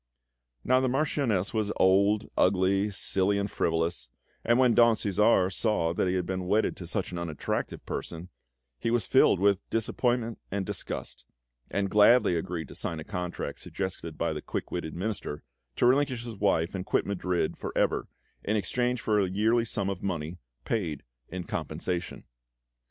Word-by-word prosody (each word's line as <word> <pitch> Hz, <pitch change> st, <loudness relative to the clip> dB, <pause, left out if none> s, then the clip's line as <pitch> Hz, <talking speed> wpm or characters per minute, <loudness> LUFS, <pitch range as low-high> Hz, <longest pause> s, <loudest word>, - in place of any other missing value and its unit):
Now, 130 Hz, -, +4 dB
the 130 Hz, 0 st, +1 dB
Marchioness 125 Hz, -8 st, 0 dB
was 110 Hz, -2 st, 0 dB
old, 100 Hz, +3 st, +3 dB
ugly, 95 Hz, +2 st, +3 dB
silly, 100 Hz, 0 st, +1 dB
and 100 Hz, 0 st, -2 dB
frivolous, 80 Hz, -6 st, -1 dB, 0.3 s
and 120 Hz, +1 st, +3 dB
when 125 Hz, -2 st, +5 dB
Don 120 Hz, -1 st, +6 dB
Cæsar 100 Hz, -2 st, +2 dB
saw 105 Hz, -7 st, +1 dB
that 90 Hz, -, 0 dB
he 90 Hz, -, +1 dB
had 90 Hz, -1 st, 0 dB
been 95 Hz, 0 st, -3 dB
wedded 105 Hz, +3 st, +2 dB
to 90 Hz, -, -7 dB
such 95 Hz, +2 st, -2 dB
an 90 Hz, -, -4 dB
unattractive 80 Hz, -4 st, -3 dB
person, 85 Hz, +2 st, -5 dB, 0.5 s
he -, -, -1 dB
was 120 Hz, 0 st, +1 dB
filled 130 Hz, -8 st, +4 dB
with 100 Hz, 0 st, +3 dB
disappointment 115 Hz, +1 st, 0 dB
and 100 Hz, 0 st, -2 dB
disgust, -, -, -5 dB, 0.5 s
and 100 Hz, -1 st, -1 dB
gladly 105 Hz, -2 st, +6 dB
agreed 85 Hz, -2 st, -3 dB
to -, -, -9 dB
sign 80 Hz, -, -4 dB
a -, -, -6 dB
contract 90 Hz, -2 st, -4 dB
suggested 90 Hz, -4 st, -5 dB
by 85 Hz, -1 st, 0 dB
the 75 Hz, -, -5 dB
quick -, -, -5 dB
witted 80 Hz, -3 st, -4 dB
Minister 95 Hz, -5 st, -4 dB, 0.3 s
to -, -, +2 dB
relinquish 130 Hz, -2 st, +2 dB
his 120 Hz, -, -5 dB
wife 95 Hz, -4 st, +1 dB
and 95 Hz, -2 st, -3 dB
quit -, -, 0 dB
Madrid 90 Hz, -4 st, -1 dB
for -, -, -5 dB
ever -, -, +1 dB, 0.4 s
in 105 Hz, -, 0 dB
exchange 125 Hz, +3 st, 0 dB
for 105 Hz, -1 st, +2 dB
a 95 Hz, -2 st, +1 dB
yearly 110 Hz, +5 st, +2 dB
sum 100 Hz, -3 st, -2 dB
of 95 Hz, -2 st, -3 dB
money 85 Hz, -2 st, -3 dB, 0.3 s
paid 85 Hz, -, -2 dB, 0.3 s
in 90 Hz, 0 st, -5 dB
compensation. 90 Hz, 0 st, -4 dB
100 Hz, 170 wpm, -28 LUFS, 90-110 Hz, 0.5 s, Don